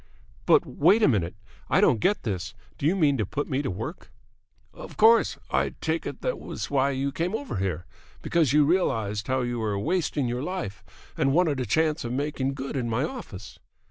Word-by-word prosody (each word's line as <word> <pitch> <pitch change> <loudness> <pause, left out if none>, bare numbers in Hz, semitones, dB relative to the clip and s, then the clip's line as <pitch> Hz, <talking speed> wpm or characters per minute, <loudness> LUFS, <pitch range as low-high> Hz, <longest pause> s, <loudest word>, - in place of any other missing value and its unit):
"But - - +5
wait 195 +9 +3
a - - +7
minute! 90 -8 0 0.3
I - - +4
don't 115 - +4
get 205 - +1
this! 105 0 -4 0.2
Do 140 - +1
you 175 - +3
mean 150 -7 +3
to - - +2
put 145 +4 -3
me 135 -1 -1
to 140 - -3
work?" 90 - -6 0.6
"Of - - -11
course. 225 +2 +5
I - - 0
take - - -2
it - - -7
that - - 0
that - - -3
was - - -6
why 140 0 +2
you 135 0 -1
came 170 +8 -2
over 275 - -4
here, 90 -3 -2 0.4
because 160 -7 +2
you 150 0 +5
realised 110 - 0
how 130 0 +1
you 120 -1 -2
were 105 -2 -1
wasting 150 - 0
your 120 +1 -2
life 145 - -5 0.3
and 135 -4 +1
wanted 160 -4 +2
a 125 - -2
chance 160 0 +1
of 120 0 -4
making 140 -1 -2
good 135 +1 -5
in 125 -3 -1
my 115 +4 0
office." 110 - -7
135 Hz, 205 wpm, -26 LUFS, 115-160 Hz, 0.6 s, a